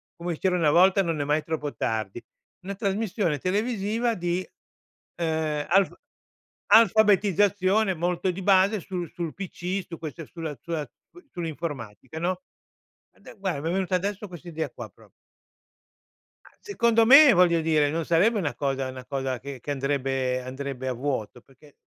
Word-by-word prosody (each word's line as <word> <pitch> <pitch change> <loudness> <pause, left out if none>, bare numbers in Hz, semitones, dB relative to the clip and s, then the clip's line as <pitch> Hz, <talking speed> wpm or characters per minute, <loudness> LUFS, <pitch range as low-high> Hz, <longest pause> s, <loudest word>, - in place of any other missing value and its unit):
come 170 -2 -4
c'era 185 -1 +1
una 160 -4 +3
volta, 190 +5 +5
"non 165 -5 -2
è - - +1
mai 150 +2 0
troppo 155 -3 -4
tardi", 110 0 -3 0.4
una 200 +1 -5
trasmissione 195 - -1
televisiva 220 - 0
di, 175 0 -2 0.7
ehm, 160 -3 -1
alf 195 +2 +3 0.7
alfabetizzazione 205 -2 +4
molto 175 +3 -1
di 190 +2 -7
base 195 +2 +4
su 180 -2 -4
sul 165 -1 -5
pc, 190 0 -4
su 165 - -8
queste 160 +1 -7
sulla 160 -4 -6
sulla 165 -4 -3 0.3
su 355 - -15
sull'informatica, 155 - -6
no? 185 +8 -1 0.7
Ade - - -14
guarda, 185 -7 -2
mi 160 - -2
è - - -1
venuta 185 -1 -1
adesso 200 +3 -3
quest'idea 170 -2 -5
qua - - -9
proprio. - - -21 1.4
A - - -21
secondo 235 - +2
me, 275 +2 +9
voglio 175 -3 +4
dire, 155 -2 +2
non 165 +1 -1
sarebbe 200 +7 +3
una 155 -7 -2
cosa 135 -2 -1
una 130 -1 -9
cosa 135 -3 -3
che 135 0 -8
che 145 - -10
andrebbe 135 -2 -1
andrebbe 130 0 -6
a 130 - 0
vuoto, 125 -3 -4
perché 140 +3 -21
170 Hz, 155 wpm, -26 LUFS, 145-195 Hz, 1.4 s, me